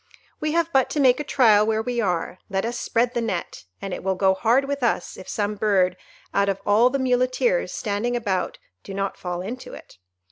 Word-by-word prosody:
We 305 0 -1
have 335 0 +1
but 265 -1 +3
to 295 - -2
make 260 -2 +5
a - - -1
trial 225 -7 +4
where 220 0 +1
we 240 0 -1
are; 180 -2 -2
let 195 +1 -1
us 240 +1 -3
spread 240 +1 0
the 240 - 0
net, 190 - -4
and 195 -2 -5
it - - -6
will 190 0 0
go 190 0 +3
hard 235 +7 +2
with 280 0 -3
us 240 - 0
if 185 - -11
some 210 0 -1
bird 195 -3 +2 0.4
out 200 0 +2
of 195 0 -1
all 220 +4 +5
the 275 - -1
Muleteers 255 - +1
standing 220 +3 -2
about 195 -6 -1 0.3
do 195 - -8
not 195 0 -2
fall 180 -1 -4
into 240 +7 -7
it. - - -15
220 Hz, 215 wpm, -23 LUFS, 195-255 Hz, 0.4 s, make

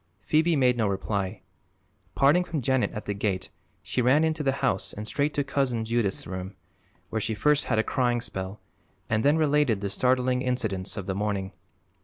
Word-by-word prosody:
Phoebe 160 - +3
made 125 -3 +3
no 110 -3 +2
reply. 100 0 -2 0.7
Parting 145 +6 +4
from 165 -6 -4
Janet 130 +1 +1
at 105 - -6
the 105 - -2
gate 100 -2 -2 0.3
she 95 +7 -1
ran 130 +6 +4
into 160 -1 0
the 135 -2 +1
house 95 - 0
and 105 - -6
straight 145 +6 0
to 145 - +1
Cousin 135 -5 0
Judith's 115 -4 0
room, 95 +3 -6 0.5
where 110 - -2
she 110 +1 -1
first 150 +7 +2
had - - 0
a 110 - +3
crying 120 -1 +1
spell 95 -3 -5 0.5
and 110 0 +2
then 145 +3 +4
related 150 -8 +2
the 100 -1 -3
startling 125 0 +2
incidents 110 -7 -2
of 100 - -4
the 95 - -2
morning. 100 -1 -2
120 Hz, 185 wpm, -27 LUFS, 100-140 Hz, 0.7 s, Parting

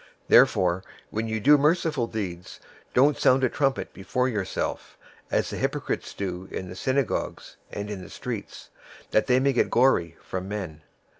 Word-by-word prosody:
006:002 - - -23 0.2
Therefore 90 0 +5 0.3
when 110 +1 -2
you 110 0 -1
do 145 +6 +6
merciful 150 -4 +2
deeds, 90 -6 -5 0.4
don't 140 +3 +4
sound 130 +1 +4
a 130 - +4
trumpet 135 +1 -1
before 125 +6 -1
yourself, 105 -6 -3 0.3
as - - 0
the - - -4
hypocrites - - -2
do 95 -1 -4
in 95 - -5
the 90 - -8
synagogues 130 +3 -2
and 105 0 -4
in 105 -2 -5
the 90 - -10
streets, - - -7 0.4
that 110 - +2
they 125 -1 +4
may 135 +1 +2
get 125 - +2
glory 100 -10 +3
from 95 0 -5
men. 90 -7 -5
110 Hz, 165 wpm, -26 LUFS, 95-130 Hz, 0.4 s, do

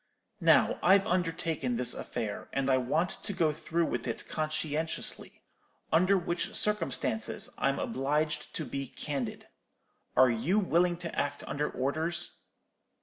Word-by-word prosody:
Now, - - +4
I've 195 +2 +5
undertaken 165 - 0
this 120 0 0
affair, 110 -4 -5
and 135 0 +1
I 130 - +5
want 155 +9 +1
to 200 - 0
go 165 -4 +2
through 165 +2 -1
with 120 -4 -3
it 115 - -4
conscientiously; 155 0 -2 0.5
under 185 +4 +5
which 175 -1 -2
circumstances 210 +2 0
I'm - - +2
obliged 150 - -1
to 155 - -1
be 140 -1 -4
candid. 135 -2 -4 0.7
Are 130 -1 +6
you 145 - +1
willing 175 -3 +2
to 170 -1 -6
act 145 0 -2
under 145 +1 -1
orders?' 155 +6 -2
155 Hz, 135 wpm, -30 LUFS, 135-175 Hz, 0.7 s, Are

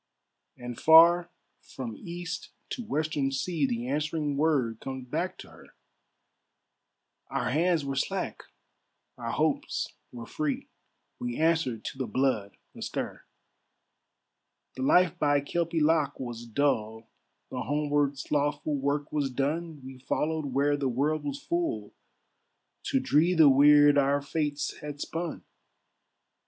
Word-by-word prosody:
And 120 -1 -7
far, 170 +2 +7 0.3
from 120 -4 -7
east 175 +2 -6 0.2
to 245 - -4
western 150 -6 -1
sea, 145 +2 0
The 120 0 -3
answering 150 +1 -1
word 140 -7 +1
comes 130 -1 -6
back - - -2
to - - -11
her, - - -17 1.5
"Our - - -1
hands 165 +1 +2
were 135 0 -3
slack, 135 - -2 0.7
our 115 -1 -5
hopes 155 +4 -1 0.2
were 120 -1 -8
free, 150 +3 -3 0.5
We 120 -1 -3
answered 160 -8 +1
to 135 - -6
the 130 - -2
blood 110 -4 0 0.2
astir; - - -5 1.5
"The 130 - -6
life 180 +5 +4
by 145 -1 +3
Kelpie 165 +3 -1
loch 150 -2 +2
was 120 -2 -6
dull, 110 -3 0 0.4
The 125 - -3
homeward 145 0 0
slothful 145 +1 -1
work 140 +2 -1
was 145 -3 0
done, 150 +3 -2
We 130 -1 -10
followed 155 +4 -1
where 140 +2 +2
the 140 -2 0
world 145 +5 0
was 285 -1 -3
full, 340 +1 -2 0.9
To 270 - +1
dree 170 - +3
the 160 -3 +7
weird 145 +1 +6
our 140 +1 +2
fates 145 -1 -2
had 150 -1 -7
spun. 165 +2 -4
145 Hz, 125 wpm, -28 LUFS, 130-160 Hz, 1.5 s, far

